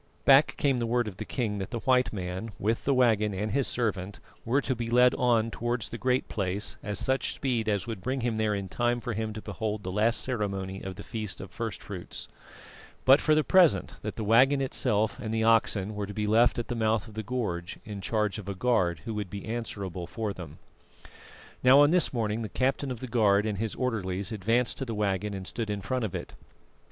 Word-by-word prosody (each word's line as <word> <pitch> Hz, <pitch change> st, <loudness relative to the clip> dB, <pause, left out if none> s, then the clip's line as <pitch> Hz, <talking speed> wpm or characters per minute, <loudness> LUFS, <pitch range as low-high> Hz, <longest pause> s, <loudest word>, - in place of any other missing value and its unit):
Back 140 Hz, +1 st, +6 dB
came 140 Hz, -3 st, +2 dB
the 120 Hz, -, -1 dB
word 120 Hz, 0 st, +1 dB
of 95 Hz, -3 st, -7 dB
the -, -, -5 dB
king 110 Hz, -6 st, -2 dB
that 95 Hz, -, -4 dB
the 120 Hz, -, -4 dB
white 130 Hz, -1 st, +3 dB
man, 95 Hz, +2 st, -4 dB
with 110 Hz, +3 st, -1 dB
the 140 Hz, -, +3 dB
waggon 110 Hz, -5 st, +3 dB
and 105 Hz, +3 st, -2 dB
his 135 Hz, +3 st, +1 dB
servant, 100 Hz, -5 st, -2 dB, 0.2 s
were 125 Hz, +5 st, +2 dB
to 130 Hz, -1 st, -1 dB
be 115 Hz, 0 st, -4 dB
led 125 Hz, +1 st, +5 dB
on 115 Hz, -2 st, +2 dB
towards 120 Hz, -3 st, -2 dB
the 120 Hz, -, -4 dB
Great 130 Hz, 0 st, +1 dB
Place 100 Hz, 0 st, -2 dB
at 105 Hz, -1 st, -2 dB
such 130 Hz, +5 st, +1 dB
speed 120 Hz, -5 st, -1 dB
as 100 Hz, -2 st, 0 dB
would 115 Hz, -5 st, -5 dB
bring 130 Hz, +3 st, -2 dB
him 115 Hz, -2 st, -1 dB
there 110 Hz, -1 st, +1 dB
in 100 Hz, -1 st, -4 dB
time 120 Hz, +5 st, 0 dB
for 120 Hz, -1 st, -4 dB
him 110 Hz, +1 st, -2 dB
to 110 Hz, -, -8 dB
behold 105 Hz, +1 st, -3 dB
the 95 Hz, -, -4 dB
last 110 Hz, +4 st, +3 dB
ceremony 100 Hz, -6 st, -3 dB
of 95 Hz, -1 st, -6 dB
the -, -, -9 dB
feast 110 Hz, -5 st, -5 dB
of -, -, -8 dB
first -, -, -5 dB
fruits; -, -, -7 dB, 0.8 s
but, 135 Hz, +2 st, +7 dB
for 155 Hz, -, +3 dB
the 155 Hz, -, +3 dB
present, 180 Hz, -2 st, +4 dB
that -, -, -5 dB
the 110 Hz, -, -4 dB
waggon 130 Hz, +6 st, +5 dB
itself 110 Hz, -4 st, 0 dB
and 110 Hz, -4 st, -4 dB
the 110 Hz, 0 st, 0 dB
oxen 110 Hz, -3 st, +3 dB
were 105 Hz, -1 st, -4 dB
to 100 Hz, -, -8 dB
be 105 Hz, -1 st, -1 dB
left 115 Hz, +3 st, +4 dB
at 120 Hz, -, -3 dB
the -, -, -2 dB
mouth 110 Hz, -2 st, 0 dB
of 110 Hz, -, -12 dB
the 110 Hz, -, -4 dB
gorge, 105 Hz, -8 st, -3 dB
in 105 Hz, -3 st, -6 dB
charge 105 Hz, 0 st, -1 dB
of 100 Hz, -1 st, -8 dB
a 100 Hz, -, -3 dB
guard, 95 Hz, -7 st, +1 dB
who 115 Hz, -, -3 dB
would 105 Hz, -3 st, -4 dB
be 100 Hz, +1 st, -7 dB
answerable 100 Hz, -6 st, -4 dB
for 110 Hz, -1 st, -3 dB
them. 90 Hz, -3 st, -9 dB, 1.1 s
Now, 130 Hz, +2 st, +8 dB
on 145 Hz, +1 st, +6 dB
this 180 Hz, -2 st, +3 dB
morning 110 Hz, -2 st, -1 dB
the 110 Hz, -, -4 dB
captain 135 Hz, +2 st, 0 dB
of 125 Hz, -3 st, -5 dB
the 130 Hz, -, -4 dB
guard 105 Hz, -4 st, +3 dB
and 105 Hz, -3 st, -2 dB
his 110 Hz, -1 st, -2 dB
orderlies 100 Hz, -5 st, -2 dB
advanced 115 Hz, +4 st, 0 dB
to 135 Hz, -, -2 dB
the 115 Hz, -3 st, -4 dB
waggon 100 Hz, 0 st, -1 dB
and 95 Hz, -1 st, -6 dB
stood 115 Hz, +2 st, -4 dB
in 105 Hz, -1 st, -2 dB
front 130 Hz, +3 st, -2 dB
of 100 Hz, -, -5 dB
it. -, -, -6 dB
110 Hz, 230 wpm, -28 LUFS, 100-125 Hz, 1.1 s, Now